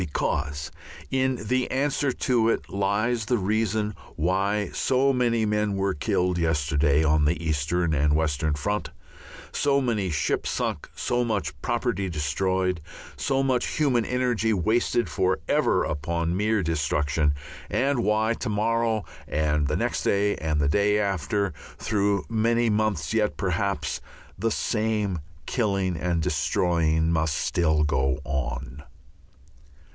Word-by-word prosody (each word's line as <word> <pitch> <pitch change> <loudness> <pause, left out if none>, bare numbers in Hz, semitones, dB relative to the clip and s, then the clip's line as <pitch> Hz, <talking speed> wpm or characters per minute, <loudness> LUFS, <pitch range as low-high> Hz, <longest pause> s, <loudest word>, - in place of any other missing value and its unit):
Because 75 0 -2 0.4
in 130 0 +1
the 130 +2 +1
answer 140 +1 0
to 120 -2 +1
it - - -1
lies 110 +4 0
the 120 +2 +1
reason 105 +1 0 0.2
why 95 +4 0
so 135 +1 +2
many 120 -3 +2
men 105 -1 0
were 95 0 0
killed 90 +1 0
yesterday 75 -2 +2
on 75 -1 +3
the 80 +4 +1
eastern 80 +2 0
and 75 0 +2
western 75 -1 0
front, 105 +8 -2 0.6
so 140 -1 +2
many 110 -8 0
ships 75 -3 0
sunk, - - -2
so 120 0 0
much 100 -11 -1
property 120 -5 -1
destroyed, 90 +4 0 0.3
so 135 0 0
much 130 -2 0
human 130 -6 +2
energy 120 -3 0
wasted 110 +5 +1
for 95 0 0
ever - - +2
upon 85 +3 -1
mere 105 +1 +1
destruction, 75 -2 +1 0.3
and 135 0 +1
why 110 +2 +2
to 115 - -4
morrow 110 0 +1 0.2
and 75 -1 +1
the 75 - 0
next - - -1
day 100 +1 +2
and 80 -1 -1
the 70 - +2
day 100 +6 +3
after 100 -1 0 0.2
through 100 -2 0
many 115 +1 +2
months 105 -5 0
yet, 110 -2 +1
perhaps 100 +1 -1 0.3
the 115 - 0
same 105 -4 0 0.3
killing 100 -7 0
and 85 0 -1
destroying 80 -1 +1
must 80 -2 +1
still 80 -2 +1
go 65 -2 +1
on. 65 -1 -3
100 Hz, 130 wpm, -25 LUFS, 80-110 Hz, 0.6 s, on